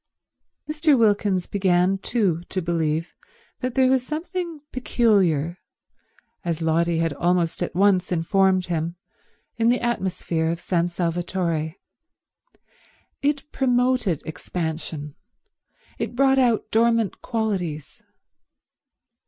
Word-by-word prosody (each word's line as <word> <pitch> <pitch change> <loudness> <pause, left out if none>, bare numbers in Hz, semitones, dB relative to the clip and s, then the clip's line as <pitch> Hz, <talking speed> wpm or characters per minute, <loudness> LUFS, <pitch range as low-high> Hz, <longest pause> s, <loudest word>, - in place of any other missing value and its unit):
Mr. 305 -2 +3
Wilkins 205 -5 +2
began 190 -1 +2
too 195 -7 0
to 190 - -2
believe 165 -2 -1 0.5
there 255 +1 +2
was 260 -1 +3
something 330 +2 -4
peculiar, 190 - +1 0.8
as 170 -2 -2
Lotty 165 +1 +2
had 165 -2 0
almost 175 +2 0
at - - -3
once 190 -1 +3
informed 185 +2 +2
him, 170 0 -2 0.6
in 230 0 +3
the 245 - +3
atmosphere 185 -8 -1
of 170 0 -2
San 175 -1 0
Salvatore. 170 -2 -2 1.5
It 290 +1 -1
promoted 250 - +1
expansion. 160 -2 -4 0.9
It - - -3
brought 270 +1 +4
out 240 -4 +2
dormant 230 -2 +2
qualities. 190 - -3
185 Hz, 100 wpm, -23 LUFS, 170-240 Hz, 1.5 s, brought